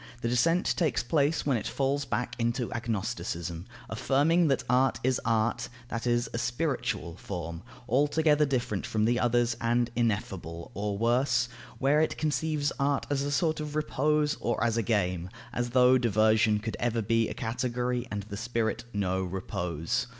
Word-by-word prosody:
The 115 - 0
descent 165 +9 +2
takes 130 -9 +1
place 145 +4 +1
when 140 -4 +2
it 105 - -4
falls 140 +1 0
back 125 -1 -2
into 120 +1 -1
agnosticism, 95 -7 -3 0.2
affirming 160 +5 +2
that 135 -3 +1
art 130 +2 +3
is 130 0 +1
art, 115 +1 0 0.2
that 115 +1 -3
is, 120 0 +2
a 115 - -1
spiritual 120 - -2
form, 85 -4 -5 0.3
altogether 150 +3 +3
different 120 -7 -1
from 110 -1 0
the 120 +1 +2
others 120 -1 +2
and 120 0 +1
ineffable; 95 -7 -2
or 100 +1 -2
worse, 125 +2 +2 0.3
where 145 +3 +3
it 160 - 0
conceives 155 -1 0
art 140 0 +1
as 140 -1 +1
a 140 - -1
sort 155 +2 +1
of 150 -1 -5
repose 150 0 +1
or 120 -1 -1
as 115 -1 +2
a 115 - +2
game; 90 -5 0 0.2
as 120 0 -1
though 125 +1 +5
diversion 110 -1 +3
could 110 +1 -4
ever 115 -2 0
be 115 +1 +2
a - - -5
category 125 +1 -2
and 100 -1 -3
the 100 0 -7
spirit 115 +1 -1
know 95 -2 0
repose! 85 -3 -2
120 Hz, 165 wpm, -29 LUFS, 110-135 Hz, 0.3 s, though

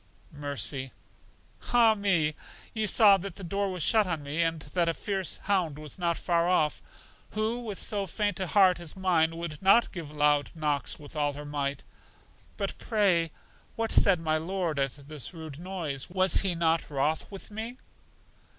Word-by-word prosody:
Mercy: 140 -2 -1 0.8
Ah 230 -2 +6
me! 185 -7 +1 0.4
You 220 -1 0
saw 205 0 +7
that 195 -1 -7
the 195 - -9
door 200 +3 -1
was 180 -4 -2
shut 215 +1 +4
on 165 -4 -3
me, 145 +4 -2
and 165 -1 0
that 170 -2 +2
a 165 - -1
fierce 195 -3 -2
hound 180 -7 0
was 150 +3 -8
not 170 -1 0
far 170 -1 +1
off. 155 -5 +1 0.5
Who, 220 +3 -1
with 215 -5 -6
so 200 -2 -2
faint 205 0 -1
a 190 - -2
heart 185 -2 +4
as 170 0 -4
mine, 165 -3 +2
would 165 -3 -6
not 195 +5 +5
give 165 -5 -7
loud 150 -1 +2
knocks 150 -4 -1
with 145 +1 -13
all 145 -1 0
her 145 +1 -8
might? 140 -1 -3 0.7
But, - - -4
pray, 190 -7 +2 0.5
what 225 0 -2
said 190 -4 +5
my 155 -1 0
Lord 170 -3 -2
at 135 -1 0
this 155 +2 -3
rude 160 -3 -8
noise? 170 -7 -4
Was 185 +1 +4
He 190 -3 0
not 165 0 +1
wroth 150 +2 -1
with 195 +1 -10
me? 225 +4 -6
170 Hz, 175 wpm, -28 LUFS, 150-195 Hz, 0.8 s, saw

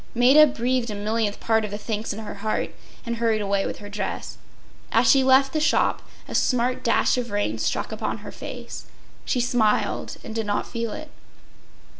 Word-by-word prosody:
” - - -29
Maida 270 +6 +7
breathed 250 -2 -1
a 210 - -4
millionth 210 0 -1
part 225 -1 +2
of 210 - -3
the 205 - -4
thanks 215 0 -3
in 205 - -5
her 215 -2 -6
heart, 215 +2 -2 0.3
and 235 0 -2
hurried 225 -2 +1
away 200 -1 0
with - - -5
her 205 - -9
dress. 205 -1 -5 0.5
As 230 +1 +4
she 270 +1 +6
left 265 +1 +4
the 310 - +1
shop 305 - +2 0.3
a - - -7
smart 250 0 +1
dash 240 +1 +2
of 240 -1 -4
rain 205 - -1
struck - - -1
upon - - -3
her - - -7
face. - - -8 0.4
She 250 - 0
smiled 240 -3 +1
and 220 - -7
did 225 -1 -2
not 205 - 0
feel 230 -1 -4
it. 310 +5 -8
230 Hz, 195 wpm, -24 LUFS, 210-250 Hz, 0.5 s, Maida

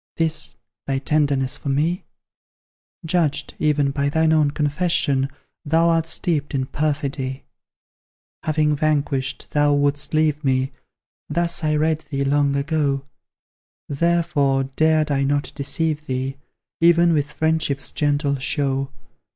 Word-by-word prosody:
This, 160 -4 0 0.3
thy 135 -1 0
tenderness 140 -2 0
for 140 - -5
me? 155 +6 0 1.0
Judged, 155 -4 0
even, 145 -2 +2
by 140 0 0
thine 160 +2 +2
own 155 -2 +3
confession, 145 -2 +1 0.3
Thou 165 +3 +3
art 165 -1 +2
steeped 150 -4 -1
in 130 -1 0
perfidy. 140 -2 -2 1.0
Having 150 -1 +1
vanquished, 140 -3 -1
thou 145 -1 +3
wouldst 145 +1 0
leave 155 -1 +1
me! 130 0 +1 0.6
Thus 170 +2 +1
I 155 0 +2
read 155 +1 +1
thee 140 -1 -1
long 140 0 +2
ago; 140 -1 0 0.8
Therefore, 145 -3 +1
dared 155 +3 +1
I 140 -1 +1
not 140 +1 0
deceive 150 +2 -2
thee, 130 +1 -2 0.4
Even 170 0 +5
with 145 -1 0
friendship's 155 -5 0
gentle 145 -1 0
show. 135 0 -1
145 Hz, 120 wpm, -22 LUFS, 140-155 Hz, 1.0 s, Even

